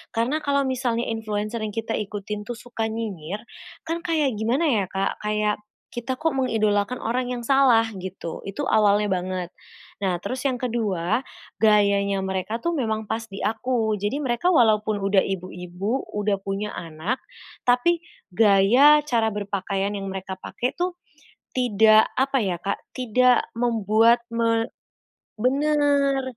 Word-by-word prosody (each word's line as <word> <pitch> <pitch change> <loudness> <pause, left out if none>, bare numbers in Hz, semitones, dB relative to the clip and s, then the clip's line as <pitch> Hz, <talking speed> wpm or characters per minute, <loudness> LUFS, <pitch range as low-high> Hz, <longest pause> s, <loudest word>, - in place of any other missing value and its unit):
karena 245 +7 +1
kalau 280 -1 +2
misalnya 245 -2 -1
influenser 215 0 -3
yang 210 - -5
kita 225 0 -2
ikutin 210 0 -5
tuh 240 - -4
suka 230 -2 -4
nyinyir, 205 -5 -5 0.5
kan 330 +1 -1
kayak 305 -6 +1
gimana 245 +9 +1
ya, 215 -7 +2
Kak, 195 0 -2
kayak 210 0 0 0.4
kita 255 +2 -3
kok 320 +1 0
mengidolakan 215 -3 +1
orang 245 +2 -1
yang 240 -1 -5
salah 260 -4 +5
gitu, 185 -3 -6
itu 280 +9 -4
awalnya 210 -2 +3
banget. 180 -1 -3 0.5
Nah 185 -3 0
terus 255 +5 -4
yang 260 -2 +1
ke-2, 220 -4 -1 0.4
gayanya 200 -2 +4
mereka 190 +4 -2
tuh 340 - 0
memang 220 -6 -1
pas 225 - -1
di 195 - -8
aku. 225 0 0
Jadi 205 +7 -2
mereka 255 +5 +1
walaupun 215 -5 +3
udah 195 0 +3
ibu-ibu, 185 +5 -4
udah 205 -1 +1
punya 200 +2 -3
anak, 165 +9 -4 0.4
tapi 250 +8 +3 0.3
gaya, 225 +9 +6
cara 230 -5 +1
berpakaian 200 -1 -2
yang 195 -1 -4
mereka 190 0 -5
pakai 250 +6 -3
tuh 355 +1 -2 0.6
tidak, 220 -3 +5
apa 270 +1 +2
ya, 185 -3 -1
Kak, 195 - -2 0.2
tidak 250 0 +3
membuat 230 0 +3
me 230 0 +1 0.7
benar, 280 +1 +2
220 Hz, 140 wpm, -24 LUFS, 200-250 Hz, 0.7 s, gaya